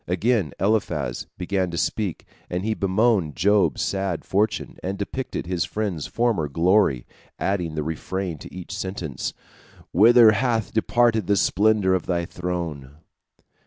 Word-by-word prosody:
Again 95 - +1
Eliphaz 85 - 0
began 95 0 -1
to 85 - -5
speak, 95 +1 -2 0.2
and 90 +2 -3
he 110 - +1
bemoaned 100 - +1
Job's 100 +3 +2
sad 95 -3 -2
fortune, 105 +2 -1
and 95 +2 -3
depicted 125 +4 -4
his 85 -2 -1
friend's 95 -2 -3
former 115 -10 0
glory, 85 - +2 0.3
adding 90 -5 -1
the 75 - -1
refrain 85 +2 -4
to - - -11
each 90 0 -7
sentence, 95 -7 -4 0.6
"Whither 115 +1 +7
hath 115 -1 0
departed 115 -2 +2
the 100 0 +3
splendor 100 +1 +3
of 95 - -1
thy 85 -2 0
throne?" 85 -7 -5
95 Hz, 135 wpm, -24 LUFS, 85-110 Hz, 0.6 s, Whither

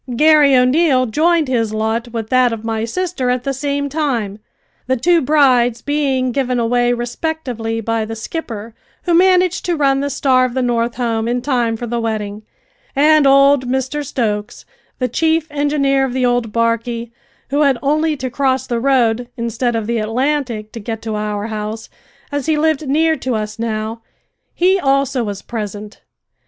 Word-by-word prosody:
Garry 300 -1 +5
O'Neil 255 +1 +3
joined 315 +6 +2
his 230 -4 0
lot 220 +2 -1
with 225 -2 -6
that 255 -1 +4
of 225 -1 -5
my 225 0 -1
sister 340 -1 -2
at 250 0 0
the 275 - -1
same 285 +1 -2
time, 255 -9 -2 0.5
the 260 0 +1
two 340 +7 +3
brides 255 -5 +3
being 275 -3 0
given 250 -1 -1
away 245 +1 +2
respectively 240 -2 -3
by 225 0 -1
the 225 +1 -5
skipper, 225 -3 -6 0.3
who 350 - 0
managed 365 0 +3
to 350 - 0
run 275 -3 +2
the 285 +1 -1
Star 260 -2 +2
of 255 -1 -2
the 260 - 0
North 235 -1 0
home 230 -2 -1
in 245 +1 0
time 240 -4 0
for 240 - -5
the 235 0 -2
wedding, 215 -2 -3 0.5
and 300 +1 +5
old 275 -1 +5
Mr 265 +3 -2
Stokes, 210 -6 -3 0.3
the 255 - 0
chief 320 +5 +1
engineer 285 -2 +1
of 265 -2 -2
the 255 -1 +1
old 245 -2 0
barquey, 230 +1 -1 0.4
who 285 +2 +2
had 275 -4 +3
only 305 +2 +1
to 260 -1 -4
cross 265 0 0
the 240 -1 -2
road, 245 -2 +2
instead 235 +1 -1
of 225 -2 -2
the 235 +1 -1
Atlantic, 235 -1 -1
to 230 - -7
get 225 +1 -6
to 220 -1 -3
our 210 -1 -3
house, 215 0 -5 0.4
as 285 0 -3
he 315 -1 +2
lived 310 -1 +1
near 320 +3 +3
to 255 -5 -3
us 215 0 -4
now 225 0 -3 0.5
he 375 +2 +3
also 275 -3 +1
was 200 -2 -5
present. 210 -2 -6
250 Hz, 175 wpm, -17 LUFS, 225-285 Hz, 0.5 s, Garry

